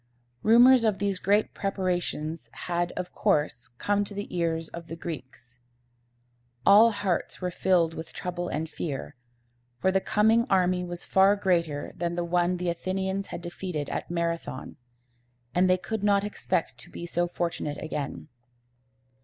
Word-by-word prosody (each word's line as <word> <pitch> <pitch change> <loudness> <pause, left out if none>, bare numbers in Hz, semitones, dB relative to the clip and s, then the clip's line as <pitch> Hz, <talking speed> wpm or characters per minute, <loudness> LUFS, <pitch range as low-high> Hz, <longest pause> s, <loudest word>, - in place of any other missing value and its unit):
Rumors 240 +3 +7
of 215 -3 +2
these 200 -2 0
great 205 +3 +2
preparations 180 -5 -2 0.2
had, 175 0 0
of 180 0 -5
course, 150 - 0
come 205 +5 +1
to 200 - -9
the 205 -2 -5
ears 165 -1 0
of 170 -1 -9
the 165 - -6
Greeks. 130 -7 -8 1.1
All 210 +4 +8
hearts 200 -5 -2
were 180 -1 -2
filled 170 -2 +2
with 160 0 -7
trouble 175 -1 -4
and 160 0 -2
fear; 145 -2 -5 0.6
for 190 +8 +2
the 190 0 +2
coming 220 +4 +3
army 180 -1 +3
was 175 0 -6
far 195 +1 +4
larger 170 -6 +1
than 170 0 -2
the 175 0 -1
one 175 +1 +1
the 180 0 -1
Athenians 190 +3 -2
had 170 - -7
defeated 175 -4 -4
at - - -4
Marathon, 170 -5 -3 0.8
and 185 +1 +3
they 185 - +5
could 200 +4 -4
not 200 -1 +3
expect 165 -10 -2
to - - -11
be 170 - -7
so 175 0 0
fortunate 170 -4 -3
again. 150 -2 -5
175 Hz, 155 wpm, -27 LUFS, 165-195 Hz, 1.1 s, All